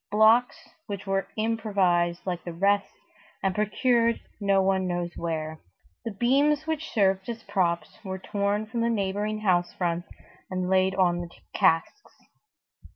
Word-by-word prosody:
Blocks 220 Hz, +4 st, +5 dB, 0.3 s
which 200 Hz, -2 st, -5 dB
were 195 Hz, -1 st, -1 dB
improvised 195 Hz, -6 st, +1 dB
like 180 Hz, -2 st, -3 dB
the 175 Hz, -, -6 dB
rest 200 Hz, +3 st, +1 dB, 0.5 s
and 195 Hz, -1 st, +1 dB
procured 230 Hz, +3 st, +2 dB, 0.2 s
no 200 Hz, -2 st, +3 dB
one 190 Hz, -1 st, +2 dB
knows 175 Hz, -1 st, -3 dB
where. 160 Hz, -2 st, -3 dB, 0.5 s
The -, -, -1 dB
beams 275 Hz, +8 st, +2 dB
which 315 Hz, -1 st, -3 dB
served 195 Hz, -1 st, +1 dB
as 230 Hz, -1 st, -5 dB
props 180 Hz, -4 st, -1 dB
were 190 Hz, -2 st, -4 dB
torn 200 Hz, +2 st, -1 dB
from 230 Hz, +2 st, -3 dB
the 235 Hz, -, +2 dB
neighboring 210 Hz, 0 st, -1 dB
house 175 Hz, -3 st, +2 dB
fronts 175 Hz, -1 st, -2 dB, 0.4 s
and 185 Hz, -1 st, -2 dB
laid 190 Hz, 0 st, +3 dB
on 175 Hz, -2 st, +2 dB
the 175 Hz, -, -7 dB, 0.2 s
casks. 165 Hz, -, +1 dB
195 Hz, 145 wpm, -26 LUFS, 180-220 Hz, 0.5 s, Blocks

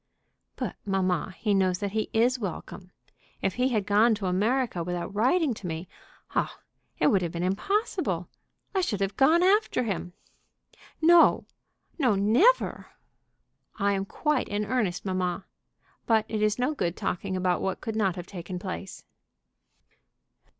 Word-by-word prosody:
"But, -, -, -4 dB
mamma, 185 Hz, -2 st, -1 dB
he 210 Hz, -2 st, 0 dB
knows 185 Hz, -2 st, +2 dB
that 200 Hz, +1 st, -3 dB
he 215 Hz, +1 st, -1 dB
is 245 Hz, +3 st, +2 dB
welcome. 185 Hz, -2 st, -6 dB, 0.5 s
If 195 Hz, -, +1 dB
he 250 Hz, +4 st, +1 dB
had 215 Hz, -6 st, 0 dB
gone 215 Hz, +3 st, +4 dB
to 205 Hz, -2 st, -5 dB
America 210 Hz, +1 st, 0 dB
without 175 Hz, +2 st, -4 dB
writing 260 Hz, -, +2 dB
to 200 Hz, -4 st, -7 dB
me 165 Hz, +2 st, -5 dB, 0.5 s
Oh, -, -, +1 dB, 0.5 s
it -, -, +1 dB
would 195 Hz, -, +3 dB
have 170 Hz, -2 st, -2 dB
been 170 Hz, +1 st, -3 dB
impossible! 210 Hz, -, -1 dB, 0.5 s
I 380 Hz, -, +2 dB
should 220 Hz, -, -1 dB
have 195 Hz, 0 st, -1 dB
gone 320 Hz, -, +4 dB
after 395 Hz, -, +3 dB
him." 180 Hz, -5 st, -3 dB, 0.9 s
"No, 340 Hz, +1 st, +6 dB, 0.5 s
no; 250 Hz, -8 st, +3 dB
never!" 245 Hz, -, +3 dB, 0.9 s
"I 200 Hz, -1 st, +2 dB
am 195 Hz, 0 st, -1 dB
quite 300 Hz, +6 st, -1 dB
in 205 Hz, +1 st, -1 dB
earnest, 205 Hz, -6 st, -1 dB
mamma. 185 Hz, -1 st, -2 dB, 0.6 s
But 220 Hz, -2 st, +3 dB
it 215 Hz, -1 st, -3 dB
is 215 Hz, 0 st, +2 dB
no 250 Hz, +5 st, 0 dB
good 180 Hz, -, -2 dB
talking 185 Hz, +1 st, -2 dB
about 180 Hz, -1 st, +1 dB
what 190 Hz, -, -2 dB
could 225 Hz, -2 st, -5 dB
not 195 Hz, -5 st, +1 dB
have 175 Hz, -2 st, -6 dB
taken 180 Hz, -1 st, -7 dB
place." 190 Hz, 0 st, -7 dB
205 Hz, 150 wpm, -27 LUFS, 185-245 Hz, 0.9 s, No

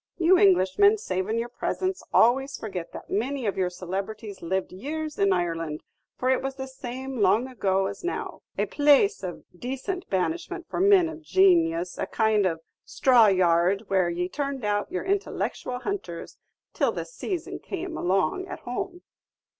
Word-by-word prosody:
You 360 Hz, +1 st, +5 dB
Englishmen, 405 Hz, -, +5 dB
savin' 190 Hz, -, -2 dB
your 230 Hz, +1 st, -1 dB
presence, 375 Hz, +7 st, -2 dB
always 265 Hz, +4 st, +3 dB
forget 185 Hz, -6 st, -6 dB
that -, -, -10 dB
many 255 Hz, +5 st, -1 dB
of 200 Hz, -, 0 dB
your 185 Hz, -2 st, 0 dB
celebrities 195 Hz, +3 st, -5 dB
lived 190 Hz, +3 st, -2 dB
years 300 Hz, +10 st, -5 dB
in 200 Hz, 0 st, +4 dB
Ireland; 165 Hz, -4 st, -1 dB, 0.3 s
for 255 Hz, +1 st, +1 dB
it 260 Hz, -, +2 dB
was 270 Hz, 0 st, -4 dB
the 265 Hz, -1 st, -5 dB
same 260 Hz, 0 st, -6 dB
long 205 Hz, +6 st, +3 dB
ago 195 Hz, -6 st, 0 dB
as 200 Hz, 0 st, -5 dB
now, 355 Hz, -, -4 dB, 0.2 s
a -, -, +1 dB
place 295 Hz, +8 st, +4 dB
of 180 Hz, -2 st, -6 dB
decent 270 Hz, -, -4 dB
banishment 340 Hz, -, -2 dB
for -, -, -4 dB
men 385 Hz, -2 st, +5 dB
of 320 Hz, 0 st, -8 dB
janius, 340 Hz, 0 st, +3 dB
a -, -, -1 dB
kind 220 Hz, -3 st, +2 dB
of 165 Hz, -2 st, -3 dB, 0.2 s
straw 250 Hz, -6 st, +5 dB
yard 185 Hz, +1 st, +3 dB
where 185 Hz, -3 st, +2 dB
ye 175 Hz, +1 st, -1 dB
turned 275 Hz, +1 st, -3 dB
out 205 Hz, 0 st, 0 dB
your 370 Hz, -, -2 dB
intellectual 385 Hz, -9 st, -2 dB
hunters 250 Hz, -, -5 dB, 0.3 s
till -, -, +2 dB
the -, -, -4 dB
sayson 375 Hz, -8 st, -5 dB
came 365 Hz, -2 st, -5 dB
on 195 Hz, -, 0 dB
at 370 Hz, -, -7 dB
home." 355 Hz, +9 st, -5 dB
250 Hz, 160 wpm, -26 LUFS, -, 0.3 s, You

